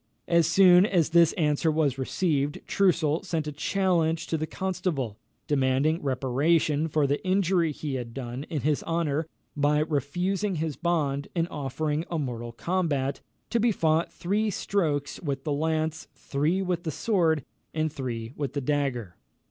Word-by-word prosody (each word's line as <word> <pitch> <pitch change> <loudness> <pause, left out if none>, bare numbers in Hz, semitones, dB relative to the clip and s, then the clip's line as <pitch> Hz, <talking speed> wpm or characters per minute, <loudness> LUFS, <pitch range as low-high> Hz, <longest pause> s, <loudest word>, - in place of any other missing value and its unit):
As 170 -2 +4
soon 180 +1 +7
as 175 -5 +2
this 170 -1 +6
answer 150 -1 +1
was 145 -4 +1
received, 145 0 0
Troussel 170 -5 +2
sent 165 -5 -2
a 150 - -3
challenge 165 0 +1
to - - -2
the 155 0 -2
Constable, 170 - -3 0.3
demanding 140 +3 +1
reparation 145 +4 +1
for 155 -2 +1
the 140 +1 -1
injury 185 -3 +2
he 150 -1 -5
had 120 -3 -4
done 125 +2 -6
his 150 -1 0
honour, 165 -2 0 0.3
by 145 0 +2
refusing 175 +7 0
his 160 -2 -2
bond, 150 -5 0
and 170 -1 +1
offering 150 +2 -2
a 170 - -2
mortal 120 -5 -4
combat, 145 -1 -1 0.3
to 235 - +2
be 235 +1 +3
fought 160 -3 +1
three 210 +5 0
strokes 160 -8 -1
with 140 -4 -3
the 150 - -1
lance, 160 +1 -1
three 155 +7 0
with 180 -2 -1
the 165 - -2
sword, 160 - +1 0.3
and 155 -1 -1
three 120 -3 -4
with 140 -3 -3
the 140 - -2
dagger. 130 -9 -1
155 Hz, 155 wpm, -27 LUFS, 140-170 Hz, 0.3 s, soon